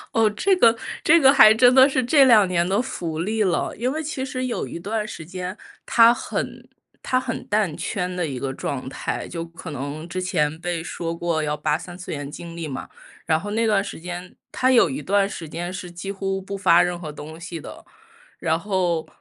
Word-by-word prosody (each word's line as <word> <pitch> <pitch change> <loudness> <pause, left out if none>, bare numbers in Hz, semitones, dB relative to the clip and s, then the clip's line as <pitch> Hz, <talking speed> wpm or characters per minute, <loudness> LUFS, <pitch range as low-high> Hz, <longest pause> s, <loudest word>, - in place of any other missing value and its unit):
哦， 225 -2 +4
这 385 - +1
个 230 -7 +5 0.3
这 335 +2 +6
个 270 0 +7
还 215 -5 +8
真 245 +2 +5
的 260 +1 +8
是 260 -2 0
这 270 +3 +5
2 220 -6 +7
年 175 -1 +1
的 200 +5 +2
福 165 -10 -4
利 215 +4 0
了。 185 - 0
因 245 +3 -1
为 315 - -3
其 280 -3 -3
实 255 -1 -3
有 245 - -3
一 - - -7
段 210 +4 -3
时 160 - -8
间， 185 +3 -6 0.3
他 230 0 +6
很 - - -5 0.3
他 255 - 0
很 250 -3 -5
淡 205 -7 +1
圈 180 -2 -3
的 180 -2 -2
一 135 -3 -5
个 135 0 -3
状 130 -1 -4
态， - - -4
就 165 -1 -5
可 165 -1 -9
能 145 +4 -5
之 185 +1 -3
前 155 -4 0
被 170 -1 -3
说 165 -1 -4
过 165 -1 -1
要 150 0 -1
扒 150 0 0
三 175 +1 -10
次 180 - -8
元 145 -1 -5
经 170 +2 -9
历 165 -2 -4
嘛， 130 - -6 0.4
然 160 -1 +2
后 205 +4 -6
那 225 +2 +1
段 210 -3 +3
时 200 - -7
间， 180 +1 -7 0.2
他 255 - +1
有 240 - +5
一 270 - -4
段 200 0 +2
时 165 -5 -7
间 175 +3 -5
是 185 -1 -7
几 180 +3 -6
乎 195 -1 -3
不 195 +1 -6
发 175 -3 +5
任 175 -1 -2
何 155 -3 -6
东 155 +2 -10
西 170 -1 -7
的。 - - -11 0.5
然 160 0 0
后， 180 -4 -1
180 Hz, 235 characters per minute, -23 LUFS, 165-220 Hz, 0.5 s, 还